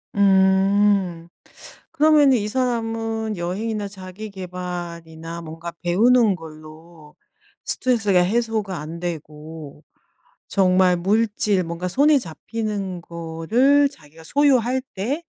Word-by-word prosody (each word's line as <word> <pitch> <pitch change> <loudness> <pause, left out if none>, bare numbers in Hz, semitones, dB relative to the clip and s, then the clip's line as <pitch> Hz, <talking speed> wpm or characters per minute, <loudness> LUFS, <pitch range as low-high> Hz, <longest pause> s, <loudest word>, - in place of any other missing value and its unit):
음. 190 -2 +3 0.6
그러면은 295 -3 +5
이 210 -1 -3
사람은 225 -3 -2
여행이나 205 +5 -3
자기계발이나 180 -4 -7
뭔가 165 +1 -8
배우는 220 +5 +4
걸로 155 0 -13 0.5
스트레스가 220 -7 +1
해소가 215 0 -1
안되고 155 -2 -7 0.6
정말 185 -2 +3
물질 205 +1 +1
뭔가 170 +2 -4
손에 285 +9 +4
잡히는 200 -1 -5
거를 170 - +1
자기가 160 - -17
소유할 260 - +2
때 245 - -2
190 Hz, 225 characters per minute, -22 LUFS, 170-225 Hz, 0.6 s, 그러면은